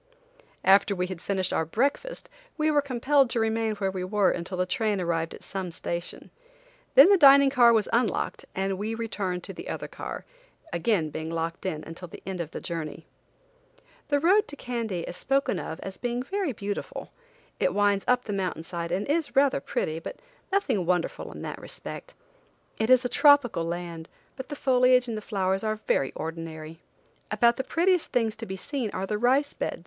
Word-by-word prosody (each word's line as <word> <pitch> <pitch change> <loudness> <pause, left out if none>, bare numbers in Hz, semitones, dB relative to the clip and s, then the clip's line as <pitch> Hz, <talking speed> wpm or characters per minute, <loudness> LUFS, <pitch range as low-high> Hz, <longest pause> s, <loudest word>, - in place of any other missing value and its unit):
After 200 +1 +5
we 180 0 0
had 180 -2 -7
finished 190 -2 -1
our - - +1
breakfast 280 - -1 0.3
we 310 0 +2
were 295 -1 +4
compelled 275 0 +2
to 235 - 0
remain 225 -1 0
where 195 -2 -1
we 185 -1 -4
were 200 +1 +2
until 180 +2 -4
the 180 - +1
train 210 +1 0
arrived 165 -2 -1
at - - -13
some 190 -2 -4
station. 170 +1 -5 0.6
Then 290 +9 +9
the 395 - +6
dining 280 -2 +8
car 240 -3 +6
was 220 -3 +2
unlocked 230 -4 0
and 190 0 -1
we 220 +2 -2
returned 200 -6 -3
to - - -7
the - - -8
other - - -4
car, - - -7 0.5
being 175 +6 +2 0.2
again 160 0 -4
locked 165 +2 -3
in 155 -4 -3
until 165 +2 -9
the - - -12
end 185 -2 -3
of 160 - -5
our - - -2
journey. 165 -1 -5 1.0
The 285 -1 +2
road 390 +7 +4
to 290 - -8
Kandy 230 -9 -3
is - - -6
spoken 275 +7 0
of 160 - -6
as 195 0 -7
being 245 0 -2
very 385 +1 -2
beautiful. 205 -3 -5 0.5
It - - +2
winds 205 -1 +2
up 250 0 +3
the 210 - -4
mountain 185 -4 -2
side 170 0 -5
and 190 +4 -1
is 295 0 0
rather 275 - +4
pretty, 155 +3 -2
but - - -7 0.4
nothing 270 - +1
wonderful 175 0 -1
in - - -9
that - - -6
respect. - - -9 0.6
It 220 +1 0
is 255 0 +6
a - - 0
tropical 275 - +4
land, 170 -1 -5 0.3
but 260 +1 -8
the 290 - -4
foliage 255 -2 +4
and 220 -2 -4
flowers 190 -1 -1
are 215 0 0
very 175 -10 0
ordinary. 160 -1 -6 0.5
About 235 0 +3
the 265 - -1
prettiest 350 +4 +1
things 225 -4 +1
to 225 0 -7
be 190 - -5
seen 255 +2 -3
are 190 - -2
the 210 +1 -2
rice 270 +5 +2
beds. - - -3
210 Hz, 190 wpm, -27 LUFS, 180-255 Hz, 1.0 s, Then